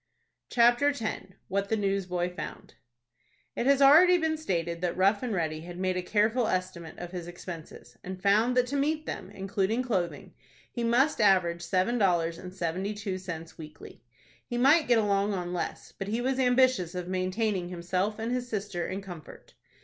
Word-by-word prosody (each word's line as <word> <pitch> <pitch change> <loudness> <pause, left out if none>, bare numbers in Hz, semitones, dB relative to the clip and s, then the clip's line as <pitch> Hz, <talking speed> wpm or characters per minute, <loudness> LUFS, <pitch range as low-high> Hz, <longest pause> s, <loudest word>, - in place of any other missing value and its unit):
CHAPTER 240 +4 +4
X. 285 -5 -4 0.4
WHAT 200 +1 -1
THE 220 - +1
NEWSBOY 180 -3 -1
FOUND. - - -8 0.8
It 240 - -1
has 280 0 +5
been 275 - +8
already 320 +1 +6
stated 170 - -2
that 180 -1 -1
Rough 195 +2 +3
and 250 -2 -3
Ready 160 -5 -2
had 175 +1 -9
made 185 0 -1
a 180 - -1
careful 220 +5 +1
estimate 180 -3 -3
of 175 0 -7
his 175 -2 -6
expenses, 175 -2 -10
and 185 0 -6
found 215 +6 +3
that 250 - +4
to 265 +3 -4
meet 305 +2 0
them, - - -6
including 195 +4 -1
clothing, 175 - -2 0.4
he 240 - -3
must 245 +4 +2
average 180 -4 +3
seven 190 +7 0
dollars 170 -4 +1
and 180 - -8
seventy 185 +3 -3
two 200 -3 -4
cents 165 -2 -8
weekly. 155 -1 -11 0.4
He 240 - -5
might 290 +6 +5
get 240 -1 +4
along 200 -1 +1
on 175 -1 -4
less, 175 - -4
but 195 - -7
he 220 +3 -1
was 260 +2 -1
ambitious 250 -8 +3
of 180 -1 -4
maintaining 185 0 -1
himself 180 +4 -2
and 225 +1 -3
his 250 0 -2
sister 195 -5 -3
in 195 +1 -5
comfort. 175 -5 -11
195 Hz, 180 wpm, -28 LUFS, 180-240 Hz, 0.8 s, been